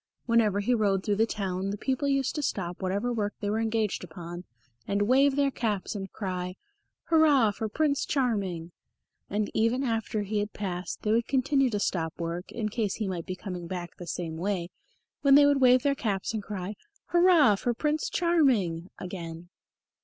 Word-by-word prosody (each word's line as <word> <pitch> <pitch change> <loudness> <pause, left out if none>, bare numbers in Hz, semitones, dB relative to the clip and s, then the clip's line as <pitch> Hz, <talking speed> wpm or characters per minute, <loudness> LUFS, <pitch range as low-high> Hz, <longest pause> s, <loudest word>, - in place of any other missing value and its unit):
Whenever 220 -4 +3
he 245 +5 +1
rode 200 -4 +1
through 205 - +1
the 225 +1 +3
town 195 -3 -2
the 205 - -3
people 265 +5 -1
used 275 -1 +1
to 300 - -2
stop 180 -10 -3
whatever 200 +6 -1
work 205 -3 -2
they 205 -1 -2
were 220 - 0
engaged 220 -3 0
upon 175 +1 -8 0.4
and 200 +1 +1
wave 265 +5 +4
their 280 -1 +2
caps 215 -6 -2
and 195 -3 -6
cry, 180 -2 -4 0.5
"Hurrah 295 -9 +5
for 215 +2 -4
Prince 285 +3 +1
Charming!" 200 - -1 0.6
and 205 +1 -1
even 230 +4 +2
after 225 -3 -1
he 210 +1 -1
had 205 +1 -3
passed 185 -3 -4
they 215 - +1
would 230 +1 +2
continue 270 0 +2
to 210 -3 -1
stop 165 -5 -1
work, 170 +2 -4
in 215 -2 -2
case 215 -3 -1
he 215 - -3
might 180 -3 -4
be 185 - -3
coming 180 -3 -6
back 175 -1 -6
the 175 - -9
same 165 -1 -4
way, 180 -1 -2 0.5
when 275 -1 +6
they 290 0 +8
would 285 -1 +3
wave 255 0 +6
their 280 - +3
caps 210 -6 -2
and 220 - -2
cry, 200 -1 -5 0.4
"Hurrah 345 - +5
for 240 +4 -1
Prince 300 +4 0
Charming!" 240 - +2
again. 175 -2 -7
210 Hz, 185 wpm, -28 LUFS, 185-255 Hz, 0.6 s, they